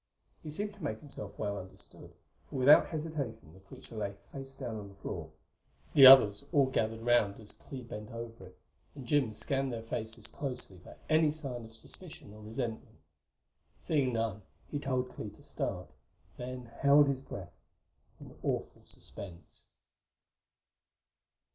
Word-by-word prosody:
He 155 - -7
seemed 205 +7 -2
to 200 -4 -13
make 110 -7 -2
himself 105 -8 -9
well 100 -1 -2
understood, 95 0 -12 0.4
for - - -8
without 135 +3 +7
hesitation 145 - -4
the 95 - -15
creature 100 +4 -12
lay 100 -2 -3 0.2
face 135 -1 -8
down 120 -5 -4
on 100 -1 -8
the 100 - -15
floor. 100 - -5 0.6
The 135 -2 +11
others 105 -7 +9
all 145 -5 +5
gathered 110 -2 0
around 115 -4 +3
as 110 -2 -11
Clee 130 -2 -9
bent 105 -2 -7
over 115 -4 -7
it, 90 - -18 0.4
and 135 -3 -8
Jim 135 -2 +2
scanned 135 +4 -1
their 115 -1 -4
faces 110 0 -3
closely 125 -7 -5
for - - -13
any 155 -1 +5
sign 135 -6 -4
of 115 0 -11
suspicion 115 - -9
or 110 - -12
resentment. 115 +1 -5 0.9
Seeing 140 -5 +2
none, 115 -2 -1 0.3
he 145 - -1
told 130 -2 -1
Clee - - -5
to - - -17
start; - - -3 0.5
then 125 0 -6
held 140 +1 +7
his 135 -1 0
breath 90 -9 -8 0.7
in - - -12
awful - - -2
suspense. 90 -4 -11
120 Hz, 155 wpm, -32 LUFS, 110-140 Hz, 0.9 s, The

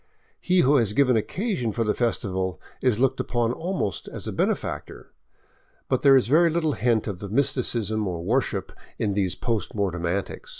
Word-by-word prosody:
He 180 0 +3
who 145 +1 +4
has 110 -5 +2
given 130 0 +3
occasion 165 - -1
for 115 +2 -1
the 105 -1 +1
festival 95 -6 -1 0.2
is 125 -5 +2
looked 130 0 +2
upon 120 -1 0
almost 170 - -3
as - - -6
a - - -3
benefactor. - - -3 0.8
But - - +1
there 135 -1 +7
is 130 - +2
very 165 +6 +5
little 160 -1 0
hint 115 -4 +1
of 100 -5 -5
mysticism 115 -4 0
or 85 -2 -4
worship 105 -2 -1 0.3
in 100 - 0
these 95 -3 0
post 115 -3 -2
mortem 90 -4 -1
antics. 95 +3 -3
115 Hz, 170 wpm, -25 LUFS, 100-135 Hz, 0.8 s, there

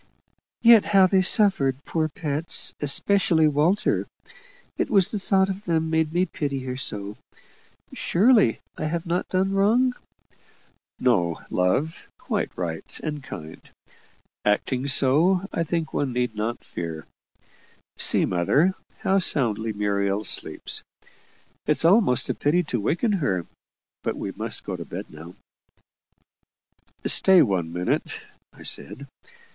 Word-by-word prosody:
"Yet 230 -3 +8
how 195 -2 +5
they 190 0 +3
suffered, 160 -9 +2
poor 155 -1 -1
pets! 150 +1 -2
especially 160 +2 +3
Walter. 155 +7 +1 0.7
It - - -1
was 195 -4 +3
the 210 - -2
thought 190 0 +2
of 195 +2 -6
them 160 -2 0
made 160 -1 +1
me 175 +2 +1
pity 140 -6 -4
her 130 0 -5
so. 105 -5 -4 0.8
Surely 210 - +3 0.2
I - - -2
have 165 +3 -2
not 175 +1 -2
done 190 +1 0
wrong?" 230 +6 +3 1.1
"No 90 -10 +1
love; 130 - 0
quite - - -2
right 80 -3 -5
and 150 -2 -4
kind. 80 - -9 0.8
Acting 125 +6 0
so, 165 +8 +3
I 165 - 0
think 165 -1 -3
one 135 -3 -1
need 125 -2 -1
not 110 +3 -3
fear. 80 -2 -6 0.9
See, - - +3
mother, 140 - +2 0.3
how 195 +1 +2
soundly 115 - +1
Muriel 100 0 -1
sleeps. - - -2 0.9
It's - - +1
almost 185 - +4
a - - 0
pity 170 +5 +1
to 125 -8 -3
waken 180 - 0
her 120 - -1 0.6
but - - -2
we - - -4
must - - -2
go - - -4
to - - -6
bed - - -8
now." 80 +3 -11 1.7
"Stay 190 -2 +6
one 90 -5 -1
minute," 90 +1 -2 0.3
I - - -15
said. 140 - -5
150 Hz, 130 wpm, -24 LUFS, -, 1.7 s, Yet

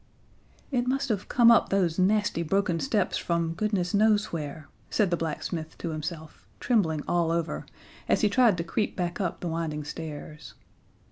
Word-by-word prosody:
"It 250 -2 0
must 270 +1 0
have 205 -3 -2
come 235 -1 +6
up 230 - +4
those 185 -3 +1
nasty 205 -2 +2
broken 180 0 0
steps 215 -5 0
from 170 -1 -1
goodness 200 -2 -1
knows 210 0 +3
where," 155 -1 -5 0.2
said 200 -4 +1
the - - +3
blacksmith 160 0 -4
to 170 - -4
himself, 155 0 -6 0.2
trembling 165 - +1
all 170 -2 +1
over, 170 0 -2 0.4
as - - +3
he 210 - +4
tried 215 -2 +4
to 165 - -1
creep 205 +5 -2
back 175 +1 -2
up 180 - -2
the 180 - -3
winding 160 -2 -3
stairs. 150 0 -8
175 Hz, 165 wpm, -27 LUFS, 160-210 Hz, 0.4 s, come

